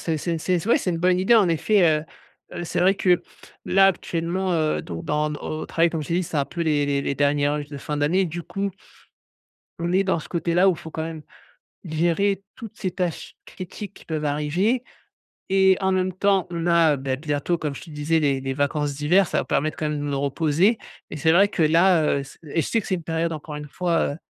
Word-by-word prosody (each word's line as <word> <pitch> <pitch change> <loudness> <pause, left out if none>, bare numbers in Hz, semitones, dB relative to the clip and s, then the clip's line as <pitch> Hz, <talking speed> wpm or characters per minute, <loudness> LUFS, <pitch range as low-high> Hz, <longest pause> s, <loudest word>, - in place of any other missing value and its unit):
C'est 165 -2 -1
c'est 165 +2 -2
c'est 180 +2 -1
ouais - - +5
c'est 185 - -2
une 165 - -2
bonne 180 +1 +2
idée, 190 +6 +4
en 210 -5 +5
effet, 190 +5 +2 0.2
heu - - -11 0.5
heu, 175 - -4
c'est - - -3
vrai 190 +2 +4
que, 180 -3 +2 0.4
là 195 +1 +5
actuellement, 180 +1 -2
heu, 155 -2 +1
donc, 85 -2 -7
dans 150 0 0
au 155 +1 -5
travail 170 0 +2
comme 160 - -3
je - - -9
t'ai 170 - 0
dit, 180 - +1
c'est 160 - -5
un 140 - +2
peu 170 +4 -7
les 150 -3 +1
les 140 -1 0
les 140 - -1
derniers 145 0 +2
rushs 145 0 -2
de 145 - -8
fin 150 +2 -4
d'année. 160 +7 +2
Du 175 0 -5
coup 195 +3 -3 1.1
on 170 +1 -2
est 190 +2 +3
dans 190 -3 +1
ce 155 - -9
côté-là 175 +2 +2
où - - +5
il 170 - -8
faut 160 - -9
quand 160 - -4
même 160 -1 -6 0.6
gérer 175 +5 0
toutes 225 -5 -10
ces 185 - -2
tâches 180 -2 -4
critiques 190 +2 -8
qui - - -16
peuvent 155 -2 -3
arriver, 165 - 0 0.7
et 190 -1 +4
en 190 - +2
même 185 0 0
temps, 195 0 +1
on 170 -1 -3
a, 170 -3 +4
heu, - - -7
bah, 135 0 -2
bientôt 150 +4 -1
comme 150 -3 -3
je - - -9
te - - -12
disais 150 +2 0
les 140 -3 +1
les 135 0 -3
vacances 145 +1 -1
d'hiver, 170 +7 +3
ça - - 0
va - - -3
permettre 155 +2 -1
quand 155 - -1
même 150 -1 -2
de - - -4
me 145 -1 -2
reposer 155 - +2 0.3
et - - -6
c'est 160 +2 +3
vrai 195 +4 +5
que 195 -5 -1
là, 165 +2 +4 0.2
heu, - - -4
c 135 - -14
et 160 +1 -1
je - - -3
sais 230 - +1
que - - -10
c'est 190 - +1
une 170 - -7
période 165 +1 -1
encore 155 -1 -7
une 150 0 -7
fois, 170 +1 0
heu, - - -9
165 Hz, 245 wpm, -23 LUFS, 150-185 Hz, 1.1 s, ouais